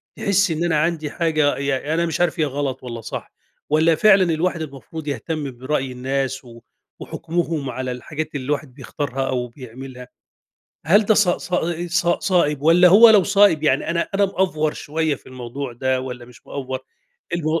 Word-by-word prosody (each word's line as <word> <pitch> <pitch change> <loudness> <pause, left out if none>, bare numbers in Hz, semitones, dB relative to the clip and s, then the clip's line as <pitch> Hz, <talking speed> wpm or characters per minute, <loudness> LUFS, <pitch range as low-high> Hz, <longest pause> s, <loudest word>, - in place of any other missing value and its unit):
تحس 200 -2 +1
إن 160 +1 -1
أنا 165 -3 +2
عندي 155 -2 -1
حاجة 155 -3 +1
ي 140 - -4
يعني، 140 +2 -1
أنا 170 +1 +1
مش 165 +1 -2
عارِف 175 0 +1
هي 155 - +3
غلَط 140 -2 -3
والّا 115 -2 -6
صح، - - -7 0.4
والّا 160 +2 +4
فعلًا 195 +2 +5
الواحد 170 +1 -1
المفروض 150 +1 -8
يهتم 145 +2 -3
برأي 135 +1 -2
الناس 130 +1 -3
و 115 -1 -13 0.4
وحُكمهم 165 -4 -3
على 130 0 -4
الحاجات 155 +5 -6
اللي 130 -3 -4
الواحد 145 -1 -3
بيختارها 135 0 -4
أو 125 -1 -1
بيعملها، 125 +1 -10 0.8
هل 205 +6 +5
ده 215 - +4
صا 190 -4 +3
صا 175 -2 -1
آآ، 170 +1 -4
صا 175 0 +2
صائِب 150 -7 +1
والّا 170 +3 +6
هو 215 +6 +9
لو 210 -3 +6
صائِب، 200 -6 +4
يعني 140 -1 +1
أنا 170 0 -1
أنا 200 +1 +3
مأفور 180 -6 0
شوية 155 0 -2
في - - -16
الموضوع 130 +1 -6
ده 130 +2 -1
والّا 125 -2 -7
مش 120 -1 -18
مأفور، 130 -2 -4 0.6
المو 160 -1 0
150 Hz, 180 wpm, -21 LUFS, 130-170 Hz, 0.8 s, هو